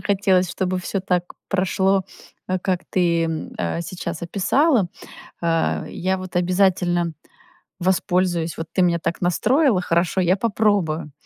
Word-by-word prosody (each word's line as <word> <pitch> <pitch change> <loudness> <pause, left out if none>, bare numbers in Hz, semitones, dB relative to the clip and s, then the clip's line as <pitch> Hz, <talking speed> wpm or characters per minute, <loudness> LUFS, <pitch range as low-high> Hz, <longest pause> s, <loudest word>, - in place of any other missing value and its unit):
хотелось, 190 -3 +2
чтобы 185 0 -1
всё 190 +2 -3
так 180 -2 -1
прошло, 190 0 +1 0.4
а, 185 0 0
как 180 0 -1
ты, 170 -2 +2
м, 160 -1 -4
э, 85 - -2
сейчас 175 -1 -6
описала. 205 - +2 0.6
Э, 165 -1 +1
я 190 +1 -1
вот 185 -1 -9
обязательно 180 -2 +2 0.7
воспользуюсь. 180 -2 +1
Вот 165 - -4
ты - - +6
меня 170 -1 +3
так 170 - -3
настроила 220 - +2
хорошо, 170 +2 +1
я 180 +2 +3
попробую. 195 -8 0
180 Hz, 135 wpm, -22 LUFS, 170-190 Hz, 0.7 s, ты